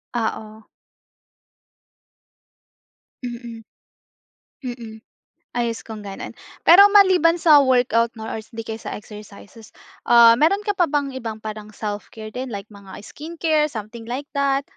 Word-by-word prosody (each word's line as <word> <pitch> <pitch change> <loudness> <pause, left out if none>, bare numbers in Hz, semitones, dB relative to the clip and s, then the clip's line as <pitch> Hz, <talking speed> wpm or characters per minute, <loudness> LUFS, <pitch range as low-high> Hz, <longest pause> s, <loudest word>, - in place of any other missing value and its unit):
Oo. 220 -1 -4 2.6
Mm. 235 -2 -7 1.0
Mm. 230 -3 -8 0.6
Ayos 235 -1 -2
kong 215 -2 -9
gano'n. 195 - -7 0.3
Pero, 350 +4 +8
maliban 370 -5 +5
sa 320 -3 +6
workout 245 -3 +2
'no, 220 -1 -7
or - - -4
hindi 225 +1 -8
kaysa 220 0 -7
exercises, 210 +1 -12 0.3
ah, 235 -1 +7
meron 375 +8 +2
ka - - 0
pa 350 - +4
bang 285 -2 -1
ibang 220 -3 -7
parang 215 -1 -8
self-care 215 +1 -6
din 250 +4 -5
like 200 +2 -8
mga 200 -2 -14
skincare, 315 +4 -1
something 225 -3 -8
like 265 +5 -5
that? 275 0 +1
230 Hz, 120 wpm, -21 LUFS, 220-280 Hz, 2.6 s, Pero